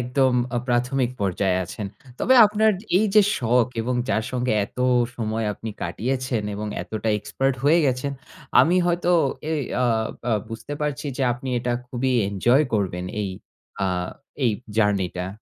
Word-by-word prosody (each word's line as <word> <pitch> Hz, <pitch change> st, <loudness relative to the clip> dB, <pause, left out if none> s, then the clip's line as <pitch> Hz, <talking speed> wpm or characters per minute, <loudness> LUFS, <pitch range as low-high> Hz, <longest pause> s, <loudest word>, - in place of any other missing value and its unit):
একদম 125 Hz, +2 st, +2 dB, 0.2 s
আ -, -, +1 dB
প্রাথমিক 125 Hz, +1 st, +1 dB
পর্যায়ে 95 Hz, -1 st, +1 dB
আছেন। 100 Hz, +4 st, -6 dB, 0.3 s
তবে 260 Hz, -, +4 dB
আপনার 215 Hz, +1 st, +3 dB, 0.3 s
এই 215 Hz, -, +3 dB
যে 210 Hz, -, +8 dB, 0.2 s
শখ, 120 Hz, -1 st, +3 dB
এবং 125 Hz, +2 st, -1 dB
যার 110 Hz, -, +1 dB
সঙ্গে 125 Hz, -1 st, 0 dB
এত 115 Hz, -, -15 dB, 0.4 s
সময় 110 Hz, -1 st, -2 dB
আপনি 110 Hz, +1 st, -7 dB
কাটিয়েছেন 125 Hz, +5 st, -2 dB
এবং 105 Hz, +1 st, -4 dB, 0.2 s
এতটা 110 Hz, +4 st, -4 dB
এক্সপার্ট 135 Hz, +6 st, -1 dB
হয়ে 160 Hz, +4 st, +5 dB
গেছেন, 130 Hz, +2 st, -1 dB, 0.5 s
আমি 175 Hz, +3 st, +4 dB
হয়তো 175 Hz, 0 st, +1 dB, 0.4 s
এ -, -, 0 dB, 0.3 s
আ -, -, +3 dB, 0.5 s
আ -, -, +3 dB, 0.2 s
বুঝতে 115 Hz, +6 st, -7 dB
পারছি 150 Hz, 0 st, -2 dB
যে 135 Hz, -, -1 dB
আপনি 130 Hz, +2 st, -7 dB
এটা 120 Hz, 0 st, -1 dB
খুবই 125 Hz, +1 st, -1 dB, 0.2 s
এনজয় 120 Hz, +9 st, +3 dB
করবেন 90 Hz, -3 st, -1 dB, 0.2 s
এই 100 Hz, -, -2 dB, 0.6 s
আ -, -, +2 dB, 0.6 s
এই 120 Hz, -, +4 dB, 0.3 s
জার্নিটা। 95 Hz, -4 st, +1 dB
120 Hz, 150 wpm, -23 LUFS, 105-135 Hz, 0.6 s, যে